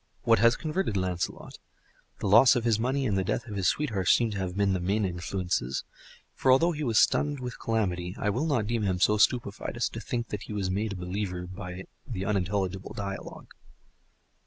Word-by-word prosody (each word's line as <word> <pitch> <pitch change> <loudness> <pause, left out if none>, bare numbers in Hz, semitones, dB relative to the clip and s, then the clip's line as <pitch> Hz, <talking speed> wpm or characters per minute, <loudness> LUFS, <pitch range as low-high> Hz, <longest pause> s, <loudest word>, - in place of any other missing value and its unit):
What 115 0 +4
has 115 +1 +5
converted 155 - -2
Lancelot? 90 -2 -3 0.6
The - - -1
loss 115 +7 +7
of 120 - 0
his 115 -2 +2
money 130 +4 0
and 105 -5 +1
the 95 - +1
death 105 - -2
of 105 -4 -7
his 95 -3 +1
sweetheart 105 - 0
seem 115 -2 +4
to 100 - -4
have 95 0 -3
been 100 -1 +2
the 95 - 0
main 100 +4 0
influences. 90 -7 -2 0.5
For 130 - +2
although 165 +7 +5
he 155 -2 -4
was 115 -5 +1
stunned 145 -1 +3
with 125 -2 -6
calamity, 90 -5 -1
I 105 - 0
will 130 +10 -1
not 130 -9 +1
deem 115 +1 -1
him 95 -3 0
so 105 +3 +4
stupefied 105 -2 +1
as - - 0
to - - -7
think 120 -1 -3
that 105 - -4
he - - -7
was 95 -3 -1
made 105 +2 -1
a - - -6
believer 90 0 -4
by 90 0 -7 0.2
the 95 -7 -4
unintelligible 95 -1 -1
dialogue. 100 -1 -6
100 Hz, 205 wpm, -28 LUFS, 95-120 Hz, 0.6 s, loss